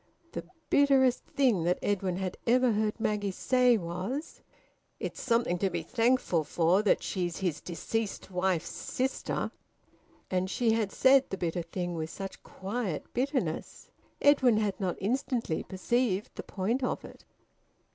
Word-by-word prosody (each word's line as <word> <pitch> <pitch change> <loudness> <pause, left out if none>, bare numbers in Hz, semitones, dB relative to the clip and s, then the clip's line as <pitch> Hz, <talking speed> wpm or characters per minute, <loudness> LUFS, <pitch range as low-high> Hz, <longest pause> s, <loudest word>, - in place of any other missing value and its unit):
The - - -5 0.3
bitterest 270 -3 +4
thing 245 -11 +2
that 175 +1 +2
Edwin 190 -3 0
had 185 -1 -3
ever 250 +1 +4
heard 215 +1 0
Maggie 210 -2 0
say 250 +4 +3
was: 185 - -4 0.6
"It's - - -5
something 230 -7 +1
to 195 - +2
be 170 -2 -3
thankful 230 -5 +2
for 170 +5 +2
that 210 - +2
she's 175 -3 -2
his 170 -6 -2
deceased 200 +4 -3
wife's 180 -2 0
sister!" 260 +1 -2 0.8
And 185 0 0
she 230 +2 +2
had 220 -3 +1
said 270 0 +5
the 195 - -3
bitter 175 -1 -1
thing 175 +1 -4
with 160 -1 -3
such 195 +3 -7
quiet 200 -2 -4
bitterness! 250 - -2 0.3
Edwin 265 -6 +5
had 210 -3 0
not 185 -3 -1
instantly 235 - -1
perceived 205 +1 0
the - - -6
point 225 +7 -2
of 250 - -2
it. - - -13
205 Hz, 145 wpm, -30 LUFS, 180-245 Hz, 0.8 s, said